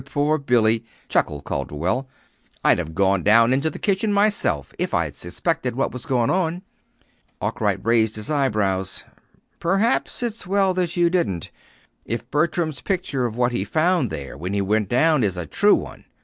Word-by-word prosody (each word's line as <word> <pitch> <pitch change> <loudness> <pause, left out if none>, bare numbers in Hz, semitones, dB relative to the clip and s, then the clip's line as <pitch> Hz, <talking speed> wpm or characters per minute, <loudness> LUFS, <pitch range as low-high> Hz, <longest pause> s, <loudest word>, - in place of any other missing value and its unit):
"Poor 145 +2 0
Billy!" 115 -4 +2 0.3
chuckled 75 -1 0
Calderwell. 85 - -2 0.5
"I'd - - +4
have 80 +1 -5
gone 95 0 +2
down 115 +5 +5
into 140 +4 +1
the - - -8
kitchen 205 +1 0
myself 200 - +1
if - - -1
I'd - - 0
suspected 130 - -2
what 135 - 0
was 125 - -7
going 120 -3 +1
on." 180 0 -1 0.8
Arkwright - - -1
raised 115 -2 +3
his 110 +6 -4
eyebrows. 105 -10 0 0.6
"Perhaps 195 +8 +1
it's 225 -5 -3
well 195 0 +2
you 175 -1 +1
didn't 100 - -1 0.6
if 115 +2 -4
Bertram's 155 -2 0
picture 160 -10 -1
of 110 - -7
what 125 0 +1
he 120 - -1
found 165 - +1
there 70 -6 -6
when 90 +7 -5
he 100 - +1
went 105 0 0
down 150 +2 +3
is 95 -3 0
a 90 - -3
true - - +4
one. - - -7
125 Hz, 165 wpm, -22 LUFS, 105-170 Hz, 0.8 s, down